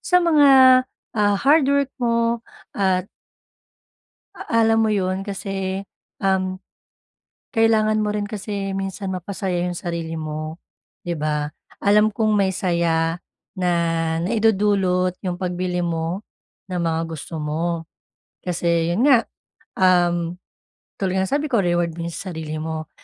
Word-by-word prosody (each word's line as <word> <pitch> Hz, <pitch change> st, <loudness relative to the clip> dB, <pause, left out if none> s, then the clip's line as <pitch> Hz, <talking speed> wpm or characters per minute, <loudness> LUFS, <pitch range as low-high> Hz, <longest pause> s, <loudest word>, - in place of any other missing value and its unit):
sa 360 Hz, 0 st, +3 dB
mga, 305 Hz, -4 st, +5 dB, 0.7 s
ah, 205 Hz, -1 st, +3 dB
hardwork 280 Hz, +1 st, +3 dB
mo 235 Hz, -1 st, +1 dB, 0.3 s
at 190 Hz, -2 st, +1 dB, 1.3 s
a 230 Hz, 0 st, 0 dB
alam 225 Hz, 0 st, +4 dB
mo -, -, +1 dB
yun, 190 Hz, 0 st, -1 dB
kasi, 195 Hz, -1 st, -3 dB, 0.4 s
um, 185 Hz, -1 st, +1 dB, 1.0 s
kailangan 220 Hz, -1 st, +3 dB
mo 210 Hz, -, 0 dB
rin 205 Hz, -1 st, -2 dB
kasi 200 Hz, -2 st, -4 dB
minsan 195 Hz, 0 st, -4 dB
mapasaya 185 Hz, -1 st, -2 dB
yung 180 Hz, -, -2 dB
sarili 170 Hz, -2 st, -4 dB
mo, 155 Hz, +1 st, -5 dB, 0.4 s
di 175 Hz, -1 st, -3 dB
ba? 150 Hz, -1 st, -1 dB, 0.3 s
Alam 210 Hz, +1 st, +4 dB
kong 215 Hz, -1 st, +1 dB
may 195 Hz, -1 st, +2 dB
saya 170 Hz, -3 st, +1 dB, 0.4 s
na 180 Hz, -1 st, +1 dB, 0.5 s
naidudulot 195 Hz, -3 st, +2 dB
yung 180 Hz, -1 st, -2 dB
pagbili 180 Hz, 0 st, -2 dB
mo, 170 Hz, +2 st, -2 dB, 0.4 s
ng 180 Hz, -2 st, -3 dB
mga 165 Hz, -1 st, 0 dB
gusto 160 Hz, 0 st, -7 dB
mo. 165 Hz, +2 st, -2 dB, 0.6 s
Kasi 170 Hz, -1 st, 0 dB
'yon 225 Hz, +11 st, +2 dB
nga, 250 Hz, -5 st, +6 dB, 0.6 s
um, 175 Hz, -2 st, +3 dB, 0.6 s
tulad 190 Hz, -1 st, 0 dB
nga -, -, +2 dB
ng -, -, -6 dB
sabi 295 Hz, -, -3 dB
ko 240 Hz, -8 st, +2 dB
reward 175 Hz, -2 st, 0 dB
mo 170 Hz, 0 st, -4 dB
sa 185 Hz, +2 st, -6 dB
sarili 155 Hz, -1 st, -5 dB
mo. 155 Hz, 0 st, -4 dB
185 Hz, 130 wpm, -22 LUFS, 170-210 Hz, 1.3 s, nga